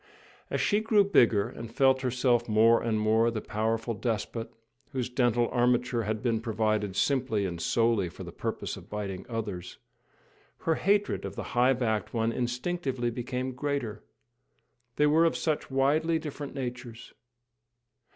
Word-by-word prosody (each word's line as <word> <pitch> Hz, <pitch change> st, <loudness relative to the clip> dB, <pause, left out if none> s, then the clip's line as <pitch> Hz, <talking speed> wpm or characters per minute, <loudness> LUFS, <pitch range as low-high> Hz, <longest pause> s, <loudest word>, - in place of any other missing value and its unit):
As -, -, -1 dB
she 205 Hz, -, +2 dB
grew 215 Hz, -2 st, +4 dB
bigger, 115 Hz, -, +4 dB
and 115 Hz, -1 st, -8 dB
felt 130 Hz, +1 st, +3 dB
herself 125 Hz, -2 st, +1 dB
more 115 Hz, +2 st, +5 dB
and 110 Hz, -2 st, 0 dB
more 110 Hz, +2 st, +3 dB
the 115 Hz, -2 st, -3 dB
powerful 115 Hz, +2 st, -1 dB
despot, 115 Hz, +1 st, -3 dB, 0.4 s
whose 125 Hz, -2 st, -2 dB
dental 120 Hz, -1 st, +2 dB
armature 120 Hz, -1 st, +1 dB
had 110 Hz, +1 st, -2 dB
been 115 Hz, -3 st, +1 dB
provided 110 Hz, -3 st, 0 dB
simply 125 Hz, -5 st, +1 dB
and 85 Hz, -3 st, -4 dB
solely 115 Hz, -5 st, +2 dB
for -, -, -10 dB
the -, -, -8 dB
purpose -, -, -4 dB
of -, -, -13 dB
biting 100 Hz, -3 st, -5 dB
others, 105 Hz, -6 st, -5 dB, 0.8 s
her 165 Hz, -, +2 dB
hatred 200 Hz, +4 st, +1 dB
of -, -, -6 dB
the -, -, -4 dB
high 125 Hz, +1 st, +4 dB
backed 115 Hz, -3 st, -1 dB
one 115 Hz, 0 st, +1 dB
instinctively 125 Hz, +1 st, -2 dB
became 125 Hz, +2 st, -3 dB
greater. 125 Hz, -5 st, -3 dB, 0.9 s
They 150 Hz, -, +3 dB
were 155 Hz, +3 st, +4 dB
of 165 Hz, -, +1 dB
such 155 Hz, -2 st, -1 dB
widely 150 Hz, +5 st, +2 dB
different 150 Hz, -2 st, -6 dB
natures! 120 Hz, -3 st, -6 dB
120 Hz, 150 wpm, -28 LUFS, 110-135 Hz, 0.9 s, more